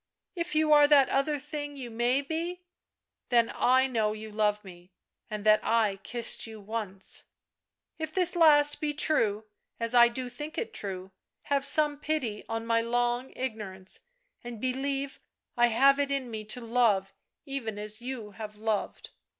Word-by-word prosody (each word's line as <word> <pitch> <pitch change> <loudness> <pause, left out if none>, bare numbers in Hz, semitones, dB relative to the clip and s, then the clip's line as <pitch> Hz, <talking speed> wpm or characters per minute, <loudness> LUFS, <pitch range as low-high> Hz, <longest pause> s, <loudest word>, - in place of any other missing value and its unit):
" - - -60
If 340 -3 -3
you 310 0 +4
are 295 -1 +7
that 285 -3 +6
other 290 +2 +1
thing 290 0 -6
you 245 -3 -7
may 240 +4 +1
be, 335 +4 -4 0.7
then 235 -2 +3
I 260 +1 +4
know 220 -5 0
you 215 0 -8
love 210 0 +1
me, 180 -1 -14 0.4
and 210 -1 -5
that 215 0 +5
I 220 -4 +2
kissed 235 +4 -2
you 220 -1 -9
once. 205 -2 -4 0.4
" - - -50
If 315 -1 -3
this 360 0 +1
last 295 -3 +5
be 295 -1 -1
true, 220 -9 +1 0.3
as 230 0 0
I 240 -1 +8
do 250 +2 -4
think 295 +6 -7
it 460 - -3
true, 190 -1 -6 0.3
have 280 -1 0
some 295 0 +3
pity 270 -10 -2
on 225 0 -3
my 230 0 +2
long 240 +2 0
ignorance 205 -7 -5 0.4
and 240 -2 -7
believe 270 +2 -2 0.4
I 240 0 +5
have 275 +5 +4
it 285 -1 +1
in 270 -3 -2
me 215 -1 -5
to 230 +4 -6
love 225 -5 +2 0.3
even 260 -7 -4
as 210 +2 -4
you 240 -4 -6
have 210 +1 -8
loved. 215 -1 -3
240 Hz, 170 wpm, -29 LUFS, 215-280 Hz, 0.7 s, I